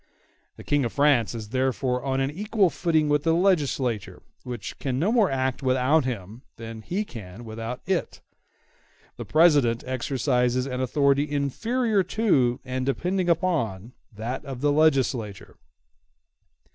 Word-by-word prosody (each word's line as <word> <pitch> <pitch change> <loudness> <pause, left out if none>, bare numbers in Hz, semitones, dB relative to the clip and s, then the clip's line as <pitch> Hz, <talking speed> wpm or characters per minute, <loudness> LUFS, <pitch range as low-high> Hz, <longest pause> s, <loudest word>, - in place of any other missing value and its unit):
The - - -12
King 145 -1 +1
of 120 - -3
France 140 -6 +3
is 110 -2 -7
therefore 130 0 -1
on 135 -1 -1
an 135 +1 0
equal 205 +1 +1
footing 160 -3 +1
with 145 0 +2
the 165 +1 +2
legislature, 145 - 0 0.2
which 120 -4 -7
can 130 -2 -2
no 180 +10 +1
more 225 -5 +3
act 130 -1 -1
without 130 +3 +2
him 110 -2 -5
than 115 -1 -8
he 190 - -3
can 110 - -10
without 115 +2 -6
it. 190 -2 -2 1.0
The - - -6
President 145 -8 +4
exercises 130 -1 0
an 130 -1 -3
authority 140 +2 +2
inferior 210 - 0
to, 170 - +1
and 130 0 -3
depending 175 +7 -1
upon, 130 - 0 0.2
that 115 +4 -5
of 135 -3 -7
the 145 0 +3
legislature. 135 -9 0
135 Hz, 140 wpm, -25 LUFS, 120-160 Hz, 1.0 s, President